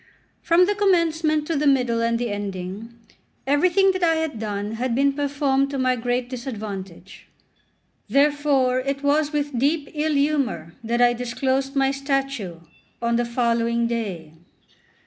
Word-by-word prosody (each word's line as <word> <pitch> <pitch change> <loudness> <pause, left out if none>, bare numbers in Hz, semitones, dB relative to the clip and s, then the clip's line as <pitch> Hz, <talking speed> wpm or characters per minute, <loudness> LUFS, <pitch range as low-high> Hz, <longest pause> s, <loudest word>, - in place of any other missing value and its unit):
From 340 +2 +4
the 410 - +1
commencement 330 -6 +1
to 330 - -2
the 295 0 +1
middle 250 -4 +2
and 230 0 +1
the 240 -2 -2
ending, 200 +2 -5 0.5
everything 365 +8 +3
that 370 0 -4
I 330 -2 +3
had 320 -7 -2
done 205 -1 -3
had 235 +2 -2
been 280 +2 +2
performed 280 -1 0
to 275 - -4
my 255 -1 +2
great 245 +1 -1
disadvantage. 205 -8 -7 0.8
Therefore, 280 -3 +2
it 275 +2 -3
was 295 +1 +2
with 290 -4 -2
deep 285 +2 0
ill 305 0 0
humour 275 - 0
that 235 +2 +1
I 240 0 +5
disclosed 260 +3 -2
my 270 -1 +2
statue 275 - -3 0.4
on 235 0 0
the 240 +1 +1
following 235 -1 0
day. 200 -10 -4
265 Hz, 145 wpm, -23 LUFS, 230-290 Hz, 0.8 s, I